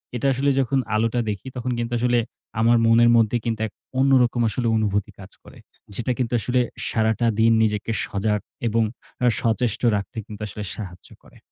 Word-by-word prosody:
এটা 125 +3 0
আসলে 135 +2 +1
যখন 135 +1 +1 0.2
আলোটা 115 +2 +1
দেখি, 105 +4 -5
তখন 125 0 -3
কিন্তু 120 0 -3
আসলে 120 0 +2 0.4
আমার 115 +1 +4
মনের 115 +1 +5
মধ্যে 115 +1 +3
কিন্তু 115 -2 -1
এক - - -16 0.3
অন্যরকম 130 -3 +3
আসলে 120 +2 -2
অনুভূতি 105 -2 0
কাজ 95 0 -11
করে। - - -15 0.4
যেটা 120 +3 -1
কিন্তু 125 -2 -2
আসলে 125 +3 0 0.3
সারাটা 110 +1 +1
দিন 115 +1 +5
নিজেকে 105 +1 -1
সজাগ 105 +1 -1 0.3
এবং 115 +1 +2 0.4
আ - - +4 0.2
সচেষ্ট 115 -2 0
রাখতে 100 +4 -5
কিন্তু 105 -1 -10
আসলে 105 +1 -7
সাহায্য 95 -4 -9
করে। - - -19
115 Hz, 170 wpm, -23 LUFS, 105-120 Hz, 0.4 s, মনের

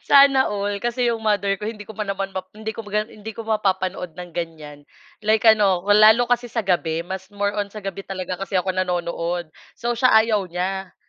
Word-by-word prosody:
Sana 275 -1 +6
all 205 0 -2
kasi 240 +2 0
yung 230 - -1
mother 200 -2 +2
ko 210 - -5
hindi 215 -1 -5
ko - - -11
pa 210 -2 -3
naman 195 0 -3
map 190 -1 -5
hindi 220 +1 -5
ko 220 0 -8
pa 210 +1 0
yun 220 - -14
hindi 220 - -5
ko 230 - -6
mapapanood 190 -5 -1
ng 180 -1 -8
ganiyan, 155 -4 -7 0.4
like 220 -1 +3
ano, 205 -5 +5
lalo 220 +3 +6
kasi 245 0 +2
sa 230 -1 -2
gabi, 170 -3 0
mas 190 +1 -6
more 205 0 0
on 205 - 0
sa 215 -1 -9
gabi 195 0 -6
talaga 185 -2 -4
kasi 195 0 -6
ako 185 +1 +1
nanonood. 175 -2 -2 0.2
So, 240 0 -2
siya, 255 -2 +4
ayaw 215 -4 0
niya 185 +2 -4
200 Hz, 210 wpm, -22 LUFS, 180-220 Hz, 0.4 s, Sana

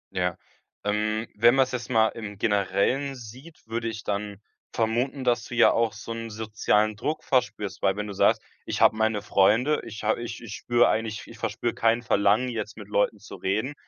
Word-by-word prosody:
Ja, 90 -1 0 0.5
ähm, 110 +2 0
wenn 120 +4 +5
man’s 135 -1 +3
jetzt 125 0 -4
mal 110 -3 +4
im 105 -3 -8
Generellen 110 +7 +1
sieht, 130 +7 -12
würde 115 0 -3
ich 110 -1 -5
dann 100 0 -3 0.3
vermuten, 120 +4 -1
dass 120 -2 +1
du 120 - -7
ja 120 - +6
auch 115 -2 +1
so 115 +2 -8
'n 115 0 -5
sozialen 110 0 0
Druck 150 +9 -3
verspürst. 105 -6 -1
Weil, 95 - +2
wenn 105 0 -3
du 105 - -6
sagst: - - +3 0.3
„Ich - - -2
habe - - +5
meine 110 -1 0
Freunde. 115 +10 +3
Ich 110 -1 -8
habe 110 +2 +1
ich 120 0 -6
ich 105 -2 -7
spüre 120 0 +3
eigentlich 110 -1 -1
ich - - -13
verspüre 120 - -2
kein 115 +1 +2
Verlangen, 110 +4 +2
jetzt 110 -2 -5
mit 105 -2 -10
Leuten 105 +1 +1
zu 100 - -10
reden.“ 110 +10 -1
110 Hz, 195 wpm, -26 LUFS, 105-120 Hz, 0.5 s, ja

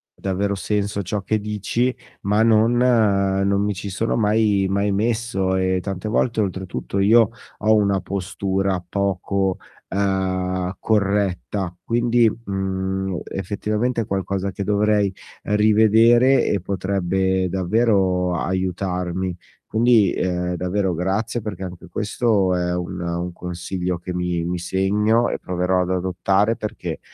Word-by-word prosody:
davvero 100 +1 -1
senso 100 0 -1
ciò 100 +2 -3
che 110 +3 0
dici, 105 +4 -1 0.3
ma 105 +2 +2
non 115 +1 +4
non 100 -5 +2
mi 105 0 0
ci 100 +1 -6
sono 110 +5 -1
mai 105 -2 +2
mai 100 +1 +1
messo, 105 -2 0
e 95 0 +1
tante 95 +1 -4
volte 115 0 +1
oltretutto 95 - -3
io 110 +2 +5 0.3
ho 110 +1 +3
una 100 -2 +2
postura 95 0 -2
poco, 95 0 -1 0.3
ehm, 95 -1 -1
corretta, 100 -3 0
quindi, 120 0 +3
mhmm, 95 -3 -3
effettivamente 105 +5 -2
è - - -3
qualcosa 100 -1 -2
che 100 - -4
dovrei 105 -1 +2 0.3
rivedere 110 +5 +4
e 100 - +1
potrebbe 95 0 0
davvero 95 -1 +1
aiutarmi. 90 0 -2 0.3
Quindi, 110 -4 +3
ehm, 90 -1 -1
davvero 90 +1 -1
grazie 100 +7 -1
perché 100 -3 -6
anche 90 -1 -8
questo 105 0 +1
è 90 0 -1
un 90 +1 -4
un 85 +1 -3
consiglio 90 +1 -4
che 90 +2 -6
mi 90 -1 -1
mi 90 0 -2
segno 105 +6 +1
e - - -3
proverò 90 +1 0
ad 90 - -2
adottare 95 +4 +1
perché, 110 -2 -5
95 Hz, 125 wpm, -22 LUFS, 90-105 Hz, 0.3 s, io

